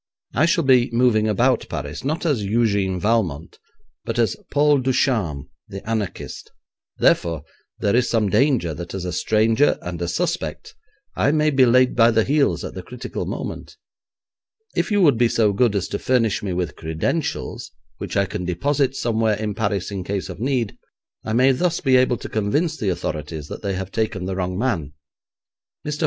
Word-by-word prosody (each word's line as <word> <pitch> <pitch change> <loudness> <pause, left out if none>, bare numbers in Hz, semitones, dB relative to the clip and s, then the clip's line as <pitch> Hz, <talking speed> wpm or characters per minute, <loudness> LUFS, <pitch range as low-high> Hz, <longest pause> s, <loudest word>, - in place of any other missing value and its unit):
I 155 +6 +3
shall 170 0 +2
be 130 -3 +4
moving 115 -3 +3
about 120 +4 +2
Paris, 75 -2 -5
not 155 +6 -2
as 145 -9 +1
Eugène 100 -3 +1
Valmont, 90 -7 -1 0.4
but 115 - -4
as 115 -5 +2
Paul 145 0 +3
Ducharme, 120 - 0 0.2
the 95 +2 -9
anarchist; 110 -4 -4 0.5
therefore, 80 -4 +2 0.3
there 100 +2 +1
is 125 0 +2
some 110 -3 +2
danger 110 - +2
that 85 +4 -7
as 95 -2 -4
a 90 - -3
stranger 110 - +2
and 90 -1 -5
a 85 - -1
suspect 85 - -3 0.4
I - - +2
may 155 0 +2
be 130 -2 +5
laid 125 +1 +4
by 115 -1 +6
the 110 -1 +3
heels 145 +2 +1
at - - -6
the - - -6
critical - - -6
moment. - - -6 1.0
If - - 0
you 205 -2 +3
would 140 -8 +4
be 120 -1 +4
so 110 -3 +2
good 110 +1 +2
as 95 - -1
to - - -3
furnish 115 -5 +1
me 100 - -3
with 90 -4 -2
credentials 80 - -3 0.3
which - - -4
I 100 - +3
can 90 - -5
deposit 135 - 0
somewhere 115 -3 +1
in 105 -1 -3
Paris 100 -3 -2
in 95 -2 -4
case 95 0 -3
of 90 - -8
need, 125 -3 -1 0.4
I 110 - -3
may 130 +3 +5
thus 170 +6 0
be 130 -2 +3
able 125 -1 +3
to - - -7
convince 145 - 0
the 105 -9 -2
authorities 75 -3 -4
that - - -7
they 100 -2 -2
have 95 +1 -5
taken 110 -4 -2
the 95 0 -3
wrong 90 -1 -2
man.' 90 - -1 0.9
Mr. 150 0 -3
110 Hz, 180 wpm, -22 LUFS, 95-130 Hz, 1.0 s, by